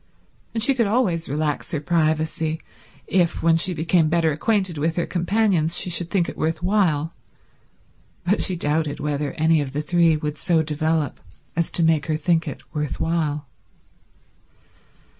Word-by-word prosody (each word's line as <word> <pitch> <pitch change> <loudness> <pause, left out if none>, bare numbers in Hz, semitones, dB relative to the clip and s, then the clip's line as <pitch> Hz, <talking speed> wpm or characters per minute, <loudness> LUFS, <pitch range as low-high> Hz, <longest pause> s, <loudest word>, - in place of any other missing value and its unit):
And 225 - +3
she 275 - +5
could 235 -5 +1
always 200 - 0
relax 150 +1 -2
her 155 - 0
privacy 160 0 0 0.5
if, 175 -4 0
when 165 0 +4
she 170 +3 +3
became 160 0 +1
better 165 -1 +2
acquainted 190 0 0
with 160 +2 0
her 175 - 0
companions, 175 -2 +1
she 180 - 0
should 170 0 +1
think 175 -3 +1
it - - -6
worth 160 +1 -2
while, 170 -6 +1 1.1
but 200 +4 +1
she 185 - +1
doubted 150 -2 -1
whether 145 -1 -2
any 160 0 +2
of 135 -2 -5
the 150 - -1
three 165 0 +3
would 150 -1 -4
so 165 -4 +2
develop 155 -1 -1 0.4
as 170 0 0
to 170 - +1
make 160 -2 +2
her 155 -1 0
think 165 +1 +1
it - - -6
worth 150 -3 -3
while. 155 -3 -1
160 Hz, 160 wpm, -22 LUFS, 155-175 Hz, 1.1 s, she